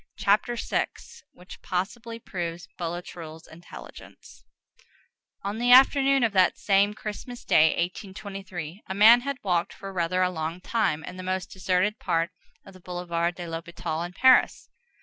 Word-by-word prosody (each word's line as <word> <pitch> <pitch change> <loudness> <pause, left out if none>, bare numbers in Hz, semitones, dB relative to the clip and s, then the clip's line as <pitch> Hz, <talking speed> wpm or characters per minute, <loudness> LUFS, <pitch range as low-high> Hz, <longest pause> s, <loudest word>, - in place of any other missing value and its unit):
CHAPTER 210 +4 +2
VI—WHICH 180 -5 -6
POSSIBLY 210 +5 -4
PROVES 170 -3 -5
BOULATRUELLE'S 165 -2 -7
INTELLIGENCE 170 +2 -13 1.0
On 200 +3 -3
the 245 +1 +2
afternoon 270 +1 +6
of 225 -3 +1
that 185 -2 +3
same 200 +1 +2
Christmas 220 +4 -8
Day, 155 - +5
1823, 190 -1 -5
a 190 - -4
man 225 +4 +7
had 280 +1 -4
walked 175 -3 0
for 195 -1 -9
rather 180 +1 0
a 180 - +1
long 160 0 -4
time 180 -6 -1
in 180 +4 -8
the - - -6
most 185 +1 -3
deserted 190 +2 0
part 165 +2 0 0.3
of 195 - -13
the 185 - -15
Boulevard 175 -1 -2
de 175 - -7
l'Hôpital 165 0 -5
in 175 - -6
Paris. 260 +5 +4
185 Hz, 145 wpm, -26 LUFS, 170-210 Hz, 1.0 s, man